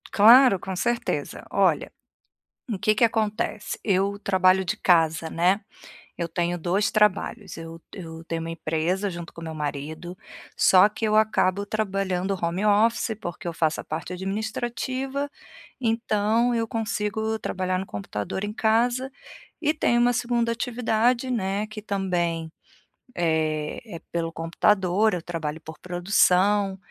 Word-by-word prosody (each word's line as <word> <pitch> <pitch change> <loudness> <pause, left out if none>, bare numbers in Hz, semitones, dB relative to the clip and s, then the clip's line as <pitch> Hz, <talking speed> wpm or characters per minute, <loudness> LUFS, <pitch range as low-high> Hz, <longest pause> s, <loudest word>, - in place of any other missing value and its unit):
Claro, 235 0 +7
com 190 +1 -5
certeza. 240 +5 -2
Olha, - - +2 0.8
o 215 - -2
que 215 +2 +2
que 225 +3 +4
acontece, 220 -1 -2
eu 200 0 +1
trabalho 190 -1 +3
de - - -1
casa, 165 -2 +2
né. 180 +6 +2 0.6
Eu 170 - -2
tenho 175 +1 -1
dois 185 +5 +1
trabalhos, 210 -1 +1
eu 165 0 -9
eu 165 -3 -9
tenho 165 0 -3
uma 165 0 -5
empresa 165 +5 -1
junto 170 -1 -7
com - - -9
o - - -6
meu 160 -1 -6
marido, 155 +4 -5 0.4
só 185 +2 +6
que 215 +2 -5
eu 215 0 +2
acabo 205 -2 +2
trabalhando 195 -3 -1
home 170 +4 -1
office, 220 +2 +3
porque 175 0 -6
eu 170 - -2
faço 160 -1 0
a - - -24
parte 160 +3 -5
administrativa, 240 +8 -3 0.5
então 230 0 +1
eu 230 -1 0
consigo 220 0 -2
trabalhar 185 -3 -2
no 190 - -3
computador 105 - -5
em 205 0 -3
casa, 240 +4 +1 0.5
e 305 -1 +1
tenho 240 -6 +2
uma 245 0 +4
segunda 235 -1 0
atividade, 235 +1 0
né, 205 -3 -1
que 215 0 -9
também, 175 -5 -1 0.7
eh, 155 -2 0 0.2
é - - -6
pelo 165 -1 -2
computador. 185 +5 +2
Eu 175 - -2
trabalho 160 -3 -4
por 160 -1 -11
produção, 190 +2 +2
195 Hz, 145 wpm, -25 LUFS, 170-220 Hz, 0.8 s, Claro